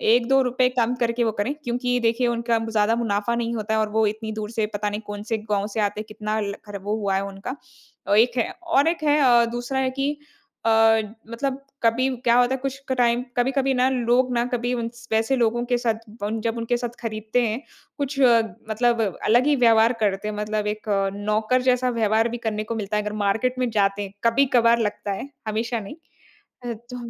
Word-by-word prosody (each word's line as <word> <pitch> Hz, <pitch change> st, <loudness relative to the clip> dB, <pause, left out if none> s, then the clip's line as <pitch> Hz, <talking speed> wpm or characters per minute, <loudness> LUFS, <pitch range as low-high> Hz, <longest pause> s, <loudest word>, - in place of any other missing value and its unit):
₹1-2 250 Hz, +1 st, +2 dB
कम 240 Hz, +1 st, +1 dB
करके 235 Hz, 0 st, +1 dB
वो 225 Hz, -, +1 dB
करे 255 Hz, +7 st, -1 dB
क्योंकि 245 Hz, 0 st, 0 dB
देखिए 235 Hz, +1 st, +1 dB
उनका 235 Hz, 0 st, 0 dB
ज़्यादा 220 Hz, 0 st, +2 dB
मुनाफा 230 Hz, 0 st, 0 dB
नहीं 235 Hz, 0 st, -2 dB
होता 220 Hz, 0 st, -2 dB
है 220 Hz, -, +2 dB
और 215 Hz, -1 st, 0 dB
वो 220 Hz, +1 st, +2 dB
इतनी 220 Hz, +1 st, -4 dB
दूर 215 Hz, -1 st, -5 dB
से 225 Hz, -2 st, 0 dB
पता 205 Hz, 0 st, -1 dB
नहीं 205 Hz, +1 st, -4 dB
कौन-से 205 Hz, +2 st, -3 dB
गाँव 200 Hz, 0 st, +1 dB
से -, -, 0 dB
आते 210 Hz, 0 st, 0 dB
हैं -, -, -9 dB
कितना 215 Hz, 0 st, -3 dB
ल 200 Hz, -1 st, -2 dB
खर 205 Hz, -1 st, -6 dB
वो 205 Hz, +2 st, -1 dB
हुआ 200 Hz, -3 st, 0 dB
है 195 Hz, -, +1 dB
उनका। 195 Hz, +6 st, -6 dB, 0.5 s
अ, 200 Hz, -, +2 dB
एक 235 Hz, +3 st, +4 dB
है 235 Hz, -, +1 dB
और 325 Hz, -4 st, +2 dB
एक 330 Hz, -1 st, 0 dB
है 295 Hz, 0 st, +3 dB
अ, 240 Hz, -3 st, +5 dB
दूसरा 245 Hz, +3 st, -2 dB
है 260 Hz, -1 st, +1 dB
कि 275 Hz, +1 st, +1 dB, 0.5 s
अ, -, -, +3 dB, 0.6 s
मतलब 265 Hz, +3 st, -2 dB, 0.2 s
कभी 230 Hz, +3 st, +3 dB, 0.2 s
क्या 235 Hz, 0 st, +5 dB
होता 245 Hz, +1 st, +3 dB
है -, -, -4 dB
कुछ 275 Hz, 0 st, -4 dB
क -, -, +2 dB
टाइम 240 Hz, 0 st, +2 dB
कभी-कभी 265 Hz, +2 st, +1 dB
ना 255 Hz, 0 st, +3 dB
लोग 250 Hz, 0 st, +2 dB
ना 235 Hz, -1 st, +2 dB
कभी 245 Hz, 0 st, -2 dB
उन 235 Hz, -2 st, -2 dB, 0.2 s
वैसे 225 Hz, +4 st, +2 dB
लोगो 240 Hz, -1 st, +1 dB
के 245 Hz, -, +4 dB
साथ 235 Hz, -2 st, +1 dB, 0.3 s
ब 205 Hz, -, -1 dB
जब 230 Hz, 0 st, -1 dB
उनके 230 Hz, +1 st, 0 dB
साथ 240 Hz, 0 st, -3 dB
खरीदते 220 Hz, +1 st, -1 dB
हैं 220 Hz, +4 st, -3 dB, 0.4 s
कुछ 280 Hz, -1 st, -3 dB, 0.5 s
मतलब 235 Hz, +1 st, +2 dB, 0.2 s
अलग 240 Hz, +4 st, +4 dB
ही 295 Hz, -, +4 dB
व्यवहार 230 Hz, -2 st, +5 dB
करते 200 Hz, -1 st, 0 dB
हैं 215 Hz, -, -3 dB
मतलब 210 Hz, 0 st, -2 dB
एक 210 Hz, +1 st, -3 dB, 0.3 s
नौकर 215 Hz, +4 st, +1 dB
जैसा 250 Hz, 0 st, +2 dB
व्यवहार 225 Hz, -1 st, +2 dB
भी 240 Hz, -, -4 dB
करने 215 Hz, -1 st, -1 dB
को 230 Hz, +2 st, -4 dB
मिलता 210 Hz, -1 st, -2 dB
है 210 Hz, -, 0 dB
अगर 210 Hz, 0 st, -4 dB
मार्केट 225 Hz, +6 st, +1 dB
में 250 Hz, -1 st, +1 dB
जाते 200 Hz, -1 st, +1 dB
हैं 195 Hz, -1 st, -6 dB
कभी-कभार 235 Hz, -1 st, +4 dB
लगता 210 Hz, -2 st, -2 dB
है, 200 Hz, +8 st, -5 dB, 0.2 s
हमेशा 225 Hz, +2 st, -1 dB
नहीं। 200 Hz, +6 st, -9 dB, 0.7 s
अ, 240 Hz, -, -2 dB, 0.2 s
तो 250 Hz, -, -6 dB
230 Hz, 215 wpm, -23 LUFS, 215-250 Hz, 0.7 s, अ